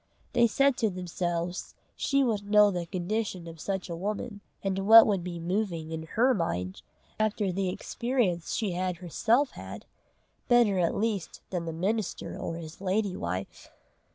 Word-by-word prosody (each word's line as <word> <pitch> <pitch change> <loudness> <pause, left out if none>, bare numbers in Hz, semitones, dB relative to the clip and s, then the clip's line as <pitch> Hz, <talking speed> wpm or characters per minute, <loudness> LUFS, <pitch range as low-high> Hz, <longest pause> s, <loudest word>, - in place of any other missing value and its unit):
They 235 -1 +5
said 275 +3 +3
to 220 - +2
themselves 175 -1 -3 0.2
she 275 -1 +2
would 210 -5 -1
know 210 -1 +6
the 175 -2 -3
condition 185 0 -2
of 165 -1 -9
such 190 -2 -2
a 170 - -4
woman, 205 +3 -4 0.2
and 195 -1 0
what 225 +1 +11
would 195 -4 +1
be 175 -1 -5
moving 170 -2 -2
in 160 0 -5
her 255 +3 +5
mind, 95 - -2 0.4
after 210 -2 +1
the 190 +1 -1
experience 230 -4 -1
she 215 -5 -1
had 180 0 -2
herself 225 - +1
had, - - -9 0.6
better 235 -6 +4
at 170 -2 +1
least 205 -5 -2
than 175 -3 -2
the 165 - -3
minister 195 +6 -2
or 165 - -4
his 165 +1 -9
lady 200 0 0
wife. 90 +2 -5
190 Hz, 160 wpm, -28 LUFS, 170-215 Hz, 0.6 s, what